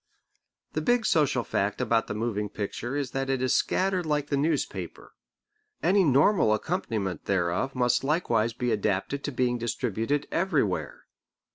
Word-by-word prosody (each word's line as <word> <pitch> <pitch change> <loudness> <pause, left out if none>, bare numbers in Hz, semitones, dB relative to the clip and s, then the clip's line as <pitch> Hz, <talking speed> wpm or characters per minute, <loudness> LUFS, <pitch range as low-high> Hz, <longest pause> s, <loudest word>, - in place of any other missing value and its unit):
The - - -1
big 245 -2 +2
social 140 -6 +2
fact 100 -1 -1
about 115 -2 +1
the - - -4
moving 105 -2 -2
picture 110 +6 -4
is 140 -3 -2
that 135 0 -2
it 135 -1 +1
is 130 -1 +1
scattered 185 -1 +1
like 150 -2 -1
the - - +3
newspaper. 150 +4 -2 0.7
Any 195 +2 +4
normal 140 - +4
accompaniment 110 - -3
thereof 95 +8 0
must 125 0 +2
likewise 120 -7 +1
be 120 +1 -1
adapted 105 +6 -1
to 145 - -2
being 125 -2 0
distributed 120 +4 -1
everywhere. 155 - -1
125 Hz, 145 wpm, -27 LUFS, 110-150 Hz, 0.7 s, Any